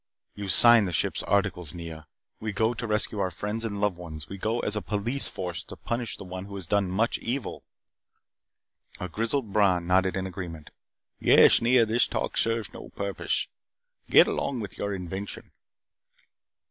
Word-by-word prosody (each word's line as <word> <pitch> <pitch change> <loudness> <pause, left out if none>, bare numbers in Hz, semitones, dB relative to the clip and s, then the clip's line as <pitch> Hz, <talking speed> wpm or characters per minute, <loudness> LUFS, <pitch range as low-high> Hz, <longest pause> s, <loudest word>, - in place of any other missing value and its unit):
"You 100 -1 -6
signed 110 +4 +6
the - - -3
ship's 80 - 0
articles, 90 -4 0
Nea. 80 -2 -8 0.3
We 110 -1 -4
go 110 +3 +1
to 115 0 -5
rescue 105 0 -1
our 95 -1 +1
friends 105 +6 -4
and 100 -3 -3
loved 100 -3 +1
ones. 80 -4 -8
We 100 - -8
go 110 +4 0
as 105 - -1
a 105 - -1
police 105 - -1
force 90 -2 -3
to - - -9
punish 115 -1 -3
one 95 0 -7
who 100 0 -9
has 95 -3 -3
done 100 +1 +1
much 110 +6 +1
evil 125 +2 -4 0.7
" - - -23
A 90 - -3
grizzled 115 - -1
Bron 95 -5 +3
nodded 95 +1 +2
in 95 - -2
agreement. 85 -4 -7 0.5
"Yes, - - +6
Nea, 120 0 +5
this 115 +2 +2
talk - - -3
serves 115 -2 +1
no - - -9
purpose. 100 -1 -2 0.6
Get - - +8
along 135 -3 -2
with 105 -3 -6
your 100 - -3
invention." 95 +1 -6
100 Hz, 170 wpm, -27 LUFS, 90-110 Hz, 0.7 s, Get